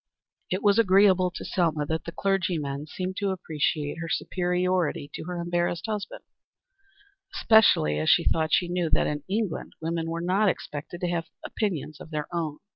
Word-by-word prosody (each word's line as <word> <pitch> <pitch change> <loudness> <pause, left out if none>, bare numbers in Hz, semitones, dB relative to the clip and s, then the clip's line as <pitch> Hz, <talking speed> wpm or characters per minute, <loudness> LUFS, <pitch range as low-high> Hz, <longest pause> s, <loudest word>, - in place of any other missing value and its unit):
It 185 - -2
was 205 +1 +4
agreeable 190 -3 +5
to 180 - -8
Selma 160 -5 0
that 160 +1 -3
the 170 - -5
clergymen 165 -7 -1
seemed 185 +3 -5
to 200 -1 0
appreciate 155 -4 -2
her 165 0 -5
superiority 180 -5 0
to - - -6
her 180 0 -4
embarrassed 175 0 -1
husband, 210 -3 -4 1.1
especially 215 - +4
as 80 - +1
she - - +5
thought 160 -1 +1
she 180 - +3
knew 175 -2 -1
that - - +2
in 150 0 -2
England 200 -2 -2
women 165 0 -2
were 165 0 -3
not 190 +4 +2
expected 150 0 -5
to 180 - 0
have 170 -1 -1 0.2
opinions 165 -8 -3
of - - -10
their 150 -2 -3
own. 160 -3 -2
175 Hz, 170 wpm, -26 LUFS, 155-185 Hz, 1.1 s, agreeable